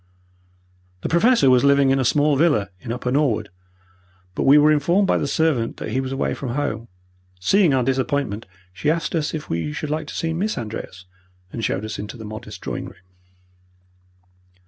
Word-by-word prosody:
The - - -3
Professor 175 - +4
was 125 0 +4
living 140 -1 +4
in 135 - +2
a - - +1
small 145 +3 +3
villa 140 -9 +2
in 115 - -6
Upper 125 +1 -3
Norwood, 130 -7 +1 0.8
but - - -2
we 140 +2 +7
were 150 +1 +6
informed 170 +7 +2
by - - +2
the - - -1
servant 140 -6 0
that - - -5
he 130 - 0
was 130 0 -5
away 135 - -1
from 125 -3 -5
home. 120 -6 -2 0.5
Seeing 185 - +3
our 130 -2 +2
disappointment, 130 -4 -1 0.3
she 145 - -1
asked 160 -1 -1
us 160 -2 -1
if 155 - -6
we 85 - -2
should 150 0 -4
like 155 0 -2
to - - -8
see 165 0 -1
Miss 205 +6 -2
Andreas, 105 -5 -6 0.5
and 115 - -4
showed 100 0 -1
us 110 - -5
into 105 +3 -7
the 110 - -9
modest 110 +1 -8
drawing - - -4
room. 90 - -13
135 Hz, 190 wpm, -22 LUFS, 115-155 Hz, 0.8 s, we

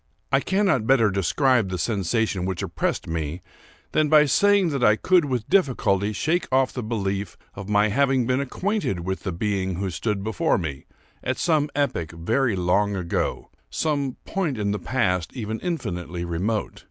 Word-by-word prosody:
I - - +4
cannot 190 - +1
better 115 -6 +4
describe 100 - +2
the 90 - -3
sensation 100 0 0
which 95 -2 -3
oppressed - - -2
me 80 +1 -4 0.5
than 155 -1 +2
by 150 -1 +6
saying 200 +6 +3
that 140 -4 -2
I 105 - +6
could 180 +7 +3
with 125 -5 -2
difficulty 120 - +2
shake 160 - 0
off 130 0 +2
the 125 - -3
belief 100 -4 -3 0.2
of 100 +1 -8
my 105 +1 +3
having 135 +2 +2
been 130 +2 +1
acquainted 180 - -2
with 95 +2 -3
the 95 - -3
being 95 0 -1
who 95 +1 -3
stood 105 +2 -2
before 110 -4 +1
me, 75 -6 -5 0.4
at 130 0 -1
some 155 -4 +1
epoch 85 - -1
very 110 +8 0
long 100 +3 +1
ago—some 135 - -2
point 170 -10 -2
of 100 -1 -1
the 105 - -2
past 90 -9 -1
even 110 -3 -4
infinitely 90 - -4
remote. 95 +6 -2
110 Hz, 165 wpm, -24 LUFS, 95-135 Hz, 0.5 s, by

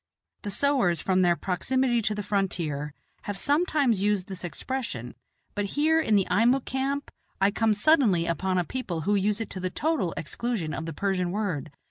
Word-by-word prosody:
The 205 - -5
sowars, 220 - +2
from 185 +3 +2
their 175 -1 +4
proximity 240 - 0
to 215 0 0
the 210 - -3
frontier, 165 -8 -2 0.3
have 205 -1 -3
sometimes 285 - +2
used 205 -2 +1
this 190 -2 -7
expression, 175 - -4 0.4
but 205 - -1
here, 320 +2 +4
in 220 -9 +2
the 195 -2 +3
Eimuck 245 +4 +3
camp, 275 +2 -2 0.3
I 195 +1 +4
come 220 0 +2
suddenly 210 - +4
upon 185 +3 0
a 180 - +2
people 175 -5 -4
who 200 +7 +1
use 205 +1 +1
it 225 - -4
to 185 - -5
the 185 0 -2
total 235 - -1
exclusion 185 -1 -3
of 160 - -4
the 165 - -4
Persian 185 +1 0
word. 180 -7 -2
205 Hz, 180 wpm, -27 LUFS, 180-245 Hz, 0.4 s, their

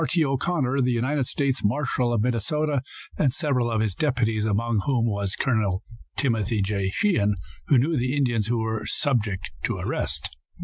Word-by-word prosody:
T. 165 0 +3
O'Connor, 135 -1 0
the 125 0 +2
United 130 +3 0
States 140 -2 0
marshal 125 +2 +1
of 115 -3 +1
Minnesota, 140 +5 0 0.4
and 135 - +3
several 135 -5 0
of 110 -2 +1
his 110 -3 0
deputies, 115 - +1
among 110 +1 +1
whom 125 -4 +2
was 100 -3 -1
Col. 105 -7 0 0.3
Timothy 115 -5 +1
J. 100 -1 0
Sheehan, 105 - +2 0.3
who 140 - +5
knew 150 +7 +2
the 130 +1 0
Indians 120 -6 +1
who 120 0 +1
were 110 -1 -2
subject 110 - 0
to - - -1
arrest. 70 -4 -3
120 Hz, 165 wpm, -25 LUFS, 105-140 Hz, 0.4 s, who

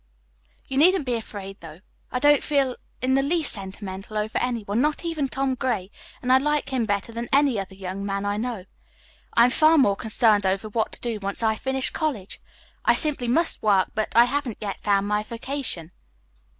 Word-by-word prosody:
"You 265 - -3
needn't 360 0 +5
be 250 - -1
afraid, 200 -4 -6
though. 165 +1 -11 0.3
I - - -1
don't 290 +2 +5
feel 275 -4 +1 0.3
in 260 +1 +2
the 270 - +4
least 315 +2 0
sentimental 195 +1 -6
over 215 +1 -1
any 245 -3 -1
one, 205 +4 0
not 300 +3 0
even 315 -4 -1
Tom 270 0 -1
Gray, 235 -7 -2 0.3
and 255 +1 +3
I 260 - +7
like 295 +1 0
him 255 -4 0
better 205 +2 -1
than 235 +1 -5
any 275 -5 +3
other 195 0 -6
young 190 +1 -5
man 200 0 -2
I 205 0 0
know. 225 -4 -3 0.7
I 235 - +7
am 250 - +2
far 315 +4 +5
more 205 -9 +4
concerned 215 -1 +2
over 195 +3 0
what 220 +1 -1
to - - -8
do 230 -3 -2
once 200 +3 -4
I 220 -1 +3
have 220 - -10
finished 265 0 0
college. 275 - -3 0.4
I - - +4
simply 290 -6 -1
must 325 +8 +1
work, 200 -3 +3
but 215 - -2
I 235 +1 +8
haven't 260 -3 -2
yet 200 -2 -5
found 200 -1 +2
my 210 0 +1
vocation. 230 - -4
235 Hz, 200 wpm, -24 LUFS, 200-270 Hz, 0.7 s, I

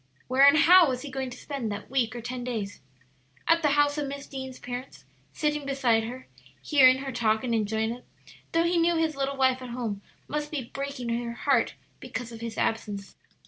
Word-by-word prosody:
Where 255 +1 +1
and 280 +2 +7
how 345 +1 +7
was 255 0 -3
he 285 - -7
going 265 -1 -3
to 245 - -9
spend 270 -7 -4
that 205 +4 -7
week 245 -4 +1
or 240 - -5
ten 245 +1 -5
days? 220 -5 -4 0.7
At 330 0 +4
the 305 - +3
house 290 0 +3
of 290 - -2
Miss 280 0 -6
Deane's 265 -1 -7
parents, 245 - -8 0.3
sitting 300 - -1
beside 255 -5 +1
her, 250 +3 -7 0.4
hearing 260 -4 +6
her 270 - -4
talk 220 -2 +1
and 240 -2 -1
enjoying 220 0 0
it, 245 +1 -8 0.5
though 330 0 +3
he 345 +1 +2
knew 340 +1 +3
his 320 -2 0
little 275 0 -2
wife 260 -1 +2
at 255 - -7
home 230 -5 -4 0.3
must 300 0 -3
be 270 -6 -5
breaking 275 -3 -4
her 235 0 -2
heart 240 +1 +1 0.2
because 245 -2 -6
of 230 -1 -9
his 230 -1 -5
absence? 205 -3 -2
255 Hz, 205 wpm, -27 LUFS, 230-280 Hz, 0.7 s, and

